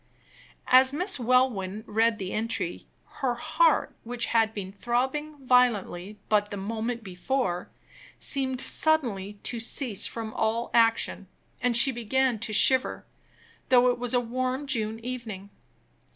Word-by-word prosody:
As 260 +1 +6
Miss 355 +2 0
Welwyn 230 -5 +1
read 225 +1 +1
the 190 -2 -5
entry, 225 +2 -3 0.3
her 260 -4 -1
heart, - - +1
which 240 0 -2
had 225 -1 +3
been 195 -3 -6
throbbing 260 +8 -2
violently 215 -6 +1
but 205 -1 +2
the 205 - -5
moment 225 +4 -4
before, 185 0 -2 0.5
seemed 260 -2 0
suddenly 240 -13 +1
to 235 - -2
cease 230 -2 -1
from 225 -1 -6
all 225 +2 -1
action, 225 -4 +2 0.3
and 245 -2 +2
she 270 - +6
began 245 0 0
to 225 0 -3
shiver, 260 +5 +3 0.6
though 250 -1 +5
it 245 - -5
was 245 0 -1
a - - +4
warm 255 +3 -2
June 225 -6 -1
evening. 225 -6 -6
235 Hz, 135 wpm, -27 LUFS, 215-255 Hz, 0.6 s, As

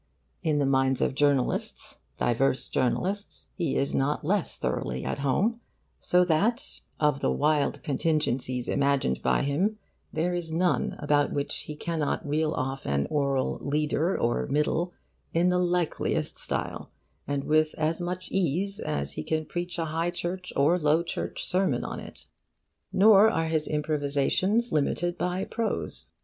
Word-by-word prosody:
In 155 -2 +1
the 145 - +2
minds 135 -1 +2
of - - +1
journalists, 140 -2 0 0.2
diverse 130 +2 +1
journalists, 190 - -1
he 170 -7 -1
is 140 - 0
not 145 +2 0
less 195 +2 +1
thoroughly 65 +1 -2
at - - -2
home, 200 - +1 0.4
so 180 0 +3
that 210 - 0 0.2
of 150 -2 +2
the - - +1
wild 150 0 +1
contingencies 135 -4 0
imagined 140 - +1
by - - +2
him 180 +10 0 0.3
there 170 +3 0
is 175 -2 -3
none 175 +2 +1
about 145 0 +2
which 140 0 -2
he 150 - -6
cannot 155 -1 -2
reel 155 +1 +1
off 135 +1 -3
an 70 0 +1
oral 140 -3 0
'leader' 150 +4 0
or 120 0 0
'middle' 155 +5 0 0.4
in 175 +2 +4
the 180 0 +2
likeliest 175 -2 0
style, - - -3 0.4
and 140 -1 -1
with 155 +1 +2
as 160 +2 0
much 180 +1 -4
ease 195 +2 0
as 70 -2 -2
he - - -4
can 155 - -1
preach 175 +2 -4
a 165 - -1
High 165 +2 -1
Church 180 +1 -4
or 155 +6 +3
Low 155 +1 +3
Church 170 - -4
sermon 190 +1 +1
on - - -5
it. - - -11 0.7
Nor 205 +2 +7
are 165 -6 0
his 155 -1 0
improvisations 150 - +1
limited 170 +4 0
by 180 +1 -1
prose. 230 -2 -3
155 Hz, 150 wpm, -27 LUFS, 140-180 Hz, 0.7 s, Nor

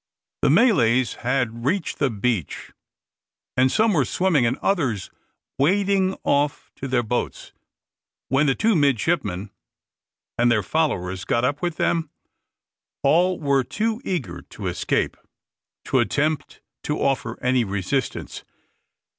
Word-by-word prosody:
The - - +3
Malays 130 - +4
had 120 -2 -1
reached 165 +7 -1
the 140 - +2
beach, 110 - -2 0.8
and 130 +1 +3
some 220 -1 +3
were 150 -6 +3
swimming 150 -2 +2
and 125 +4 -1
others 130 - -1 0.5
wading 190 +4 +2
off 145 +1 0
to 135 - -5
their 125 -2 +1
boats, 120 +2 -3 0.7
when 135 +3 +2
the 135 - +2
two 225 -1 +2
midshipmen 115 - 0 0.9
and 120 0 +4
their 105 -3 +2
followers 95 - -1
got 120 +5 +1
up 145 +3 -1
with 175 -2 -1
them. 165 -1 0 0.9
All 175 +6 +3
were 140 -3 +2
too 220 - -2
eager 175 -9 -3
to - - -10
escape - - -1 0.7
to - - +2
attempt 155 +1 -1 0.2
to 150 - -1
offer 135 -1 -1
any 125 -1 +2
resistance. 100 +6 -3
140 Hz, 125 wpm, -23 LUFS, 120-170 Hz, 0.9 s, Malays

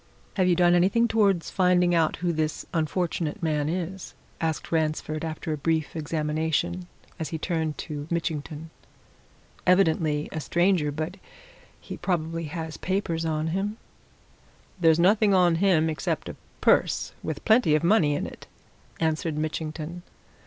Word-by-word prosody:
"Have 185 -2 +2
you 180 - +4
done 175 0 +4
anything 195 +7 +3
towards 200 -6 +2
finding 180 -1 +3
out 165 -2 +2
who 175 -1 -1
this 155 -1 -2
unfortunate 165 0 -1
man 150 -2 0
is?" 180 +2 -4 0.3
asked 160 -1 -2
Ransford, 155 -1 -1
after 160 0 -3
a - - -3
brief 160 +1 -1
examination, 160 +3 -1 0.3
as 160 - -3
he 160 - -3
turned 160 -2 -2
to 150 -2 -6
Mitchington. 160 -1 -3 1.0
"Evidently 160 -5 +3
a 160 - -3
stranger 175 -1 +2
but 160 +5 -4 0.6
he - - -8
probably 165 -2 -2
has 160 0 -5
papers 185 -4 -1
on 155 0 -1
him." 200 +5 -2 1.0
"There's 165 -2 +5
nothing 200 +3 +4
on 175 -3 +4
him 175 -5 +4
except 155 -3 -2
a - - -7 0.3
purse, - - +2
with 155 - -5
plenty 220 -9 +5
of 155 - 0
money 170 -6 +4
in - - -2
it," - - -10 0.5
answered 160 -1 0
Mitchington. 155 +2 -4
165 Hz, 140 wpm, -26 LUFS, 155-180 Hz, 1.0 s, There's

